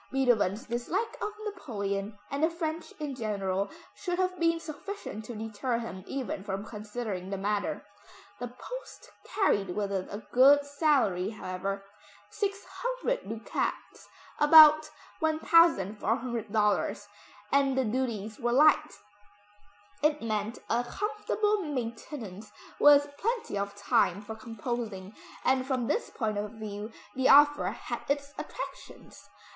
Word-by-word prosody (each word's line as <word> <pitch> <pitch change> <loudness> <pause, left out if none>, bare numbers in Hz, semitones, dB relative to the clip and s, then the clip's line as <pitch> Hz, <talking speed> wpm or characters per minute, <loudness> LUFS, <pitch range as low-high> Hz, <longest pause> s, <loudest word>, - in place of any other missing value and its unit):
Beethoven's 245 -4 +2
dislike 245 - -2
of 420 - -1 0.2
Napoleon, 205 - -3
and 280 +2 -1
the 320 - +5
French 330 -1 -4
in 295 -2 -3
general, 200 -5 -1 0.2
should 355 -2 -3
have 370 -1 0
been 335 0 +2
sufficient 320 - -7
to 240 - -7
deter 225 +3 -2
him 225 -5 -6
even 250 -8 -4
from 195 0 -4
considering 210 -3 -5
the 195 - -3
matter. 205 +1 -2 0.5
The 245 - -3
post 375 - -9 0.2
carried 195 - +2
with 205 -1 -1
it 190 -2 -2
a 205 +2 -6
good 280 +3 +7
salary 280 - +2
however, 195 -1 -4 0.5
600 485 - -3
ducats 225 +1 -4 0.3
(about 305 0 +8 0.3
$1,400), 225 - +2 0.4
and 275 -1 +3
the 265 - +2
duties 220 -3 -2
were 240 0 0
light. 305 +3 +4 1.0
It 300 -1 +2
meant 215 0 -2
a 240 +1 +1
comfortable 420 - -1
maintenance 230 - -5 0.3
with 290 0 +6
plenty 465 - -1
of 200 0 -2
time 200 -1 +2
for 220 - -6
composing, 220 -3 -5 0.3
and 260 0 +3
from 255 -2 -1
this 455 - -1
point 215 -3 -2
of 210 +1 -4
view, 215 0 -6 0.2
the 260 +1 +2
offer 290 +1 +7
had - - -4
its 285 0 -1
attractions. - - -9
240 Hz, 125 wpm, -29 LUFS, 205-300 Hz, 1.0 s, about